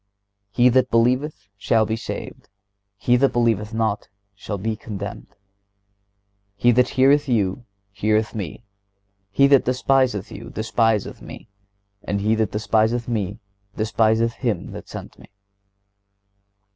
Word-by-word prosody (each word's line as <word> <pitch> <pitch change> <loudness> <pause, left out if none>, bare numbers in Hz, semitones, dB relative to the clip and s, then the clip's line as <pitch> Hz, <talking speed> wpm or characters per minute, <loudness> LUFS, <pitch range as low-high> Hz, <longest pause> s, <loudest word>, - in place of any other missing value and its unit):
(122) 120 - +3
"He 125 - +8
that 130 +1 +3
believeth 125 0 +1
shall 110 +1 +2
be 110 - -1
saved; 115 - -7 0.5
he 120 +4 +2
that 135 +2 +3
believeth 115 -3 +1
not 110 -2 -1 0.2
shall 100 +1 -6
be 110 +3 -2
condemned."(123) 105 -2 -8 1.2
"He 120 +5 +3
that 125 +1 +3
heareth 140 +2 +3
you 110 0 0 0.3
heareth 110 +2 0
Me; 105 +1 -6 0.7
he 140 +8 +4
that 140 -1 +5
despiseth 130 -4 +1
you 115 +3 -9
despiseth 110 -1 0
Me; - - -11 0.5
and 100 - -2
he 105 +2 +1
that 110 -2 0
despiseth 110 +3 +1
Me 105 -4 -2 0.4
despiseth 110 +1 +2
Him - - -3
that - - -9
sent - - -9
Me." - - -16
110 Hz, 130 wpm, -22 LUFS, 105-120 Hz, 1.2 s, He